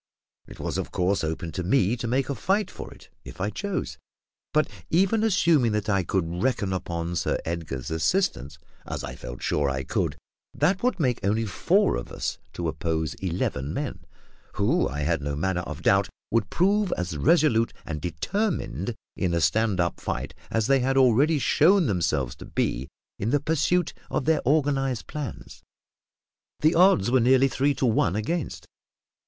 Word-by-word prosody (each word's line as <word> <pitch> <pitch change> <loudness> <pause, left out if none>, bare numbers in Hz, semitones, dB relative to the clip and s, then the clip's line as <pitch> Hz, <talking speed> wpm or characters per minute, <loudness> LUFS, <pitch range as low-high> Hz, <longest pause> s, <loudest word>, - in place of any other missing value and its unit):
It - - -12
was - - -2
of - - -4
course 90 +1 0
open 80 +1 -3
to 90 - -3
me 100 +3 +2
to 120 - -4
make 130 +3 +1
a 140 - -1
fight 200 +8 0
for - - -8
it, - - -15
if - - -11
I 100 +3 -1
chose; 200 - -4 0.5
but, 155 0 +2 0.2
even 195 +6 +3
assuming 170 - +3
that 105 0 -1
I 100 -2 +3
could 85 0 -2
reckon 110 -7 0
upon 85 -2 -3
Sir - - 0
Edgar's 80 -5 -4
assistance 80 - 0 0.3
as - - -4
I - - -5
felt - - -8
sure 75 -2 +1
I 65 0 -2
could - - -1 0.4
that 190 +1 +2
would 245 -6 0
make 125 -6 +1
only 110 +3 +1
four 100 - +2
of - - -7
us - - -3
to 85 - -3
oppose 80 -2 -2
eleven 85 -6 -2
men, - - -3 0.6
who, 125 - +2
I 75 +2 -4
had 80 0 0
no 70 0 -2
manner 90 +4 0
of 85 -1 -7
doubt, 100 0 +3 0.2
would 105 -3 +1
prove 200 +2 +2
as 90 -2 -3
resolute 115 - +3
and 75 -2 -5
determined 95 - -2 0.2
in 90 -3 0
a - - +2
stand 100 +5 +2
up 85 -1 0
fight - - -4 0.2
as 115 -1 0
they 135 +2 +4
had 135 +1 +1
already 135 +5 +4
shown 170 +7 +4
themselves 75 - 0
to - - -10
be 65 +3 -1 0.3
in 105 - -1
the 145 +3 +3
pursuit 160 +4 +1 0.2
of - - -1
their 160 0 +3
organised 135 -4 +1
plans. 150 -5 -7 1.0
The 155 +2 +4
odds 165 - +4
were 130 - +5
nearly 130 +3 +5
three 135 +2 +1
to - - 0
one 110 -6 +2
against 145 +10 -2
us. - - -21
110 Hz, 175 wpm, -26 LUFS, -, 1.0 s, were